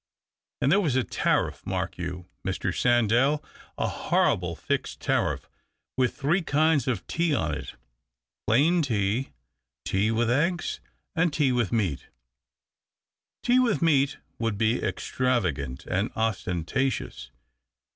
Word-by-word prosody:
And 140 - +3
there 195 - +5
was 150 -9 0
a 130 - +3
tariff, - - 0
mark - - -3
you, 90 0 -5 0.2
Mr. - - -2
Sandell, 120 +5 +3 0.3
a - - 0
horrible 90 -2 +1
fixed - - -3
tariff - - 0 0.5
with 125 -2 +1
three 155 +7 +2
kinds 155 -2 +2
of 120 -7 -1
tea 170 -3 0
on 80 - 0
it 75 - -6 0.4
— - - -64
plain 155 +10 +4
tea, 115 -2 0 0.6
tea 100 +3 +1
with 115 +1 +1
eggs, 165 +6 0 0.4
and 165 0 +2
tea 145 -3 +2
with 120 -6 +1
meat." 100 - -1 0.7
" - - -65
Tea 245 +1 +4
with 235 -8 +2
meat 145 -3 +3 0.2
would 115 -3 -1
be 110 +3 +1
extravagant 90 - -1
and 95 +4 0
ostentatious. 110 +4 -2
120 Hz, 130 wpm, -26 LUFS, 100-145 Hz, 0.7 s, there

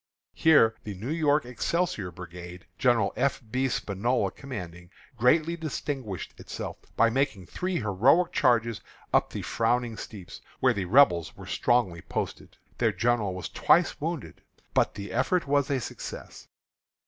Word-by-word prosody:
Here 145 -9 +5
the 105 -2 -6
New 110 +10 -5
York 150 -3 +2
Excelsior 125 - -1
Brigade, 90 0 -10
General 120 -6 +3
F. 135 +1 +1
B. 130 +1 +1
Spinola 105 -1 0
commanding, 90 -10 -8 0.3
greatly 155 +8 +3
distinguished 140 - -4
itself, - - -6 0.2
by 115 0 +5
making 130 -7 0
three 185 - -3
heroic 125 - +3
charges 115 -3 +2 0.3
up - - +3
the - - -5
frowning 115 0 0
steeps, 95 -5 -9 0.2
where - - +4
the 100 -2 -2
Rebels 90 - +4
were - - -10
strongly 95 -9 +1
posted. - - -5 0.2
Their - - +3
general 115 -5 0
was 90 - -5
twice - - +2
wounded. - - -4 0.3
But - - +2
the 100 0 -6
effort 170 +8 +1
was 140 0 +1
a 140 -2 +1
success. 120 - -8
120 Hz, 140 wpm, -27 LUFS, 95-140 Hz, 0.3 s, Here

